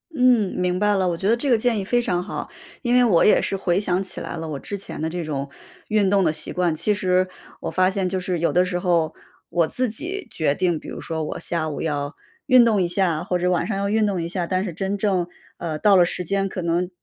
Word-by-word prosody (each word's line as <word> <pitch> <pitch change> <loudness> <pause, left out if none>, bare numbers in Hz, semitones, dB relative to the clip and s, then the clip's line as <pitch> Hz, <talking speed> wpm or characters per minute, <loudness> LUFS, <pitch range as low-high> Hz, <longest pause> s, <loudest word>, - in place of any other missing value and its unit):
嗯， 250 -7 +3
明 180 0 0
白 210 0 +3
了， 190 -2 +1
我 170 - -2
觉 190 - -2
得 225 - +4
这 270 +4 -1
个 240 - +5
建 230 0 +1
议 - - -2
非 240 +5 +1
常 180 -6 -1
好。 200 - -6 0.3
因 240 -2 0
为 250 - +6
我 200 -9 +4
也 - - +5
是 195 - -1
回 180 -1 +1
想 185 -2 0
起 190 - -6
来 - - -5
了 160 - -5
我 150 -3 -4
之 200 - -5
前 195 - -5
的 160 - -1
这 175 +1 -4
种 140 -3 -4 0.4
运 210 -2 +3
动 195 0 +3
的 160 - +3
习 155 - -4
惯， 180 -2 +1
其 210 +7 +1
实， 185 -2 +1 0.3
我 - - -4
发 185 0 +3
现 190 -1 -1
就 185 +1 -1
是 180 -1 -2
有 170 - +1
的 180 - +4
时 180 -1 -2
候 170 -3 +1 0.4
我 170 -1 +2
自 255 +6 -1
己 355 - -5
决 150 -3 0
定， 175 -2 0
比 - - -12
如 - - -7
说 160 -1 -3
我 150 - -4
下 160 -2 -1
午 145 - -5
要 145 -2 -2 0.3
运 255 -3 +7
动 220 -4 +3
一 175 - +1
下， 175 -3 +1
或 180 - -1
者 180 +1 0
晚 180 -2 +1
上 200 -3 -2
要 200 0 -1
运 215 +1 +2
动 190 -4 -1
一 165 - -3
下， 175 -1 -2
但 185 +1 0
是 185 -4 -4
真 195 +4 -2
正， 190 -4 0 0.3
呃， 160 -3 -4
到 200 +5 +4
了 175 - +6
时 180 - -2
间 195 +3 0
可 190 - -5
能 170 +1 0
185 Hz, 290 characters per minute, -23 LUFS, 170-205 Hz, 0.4 s, 运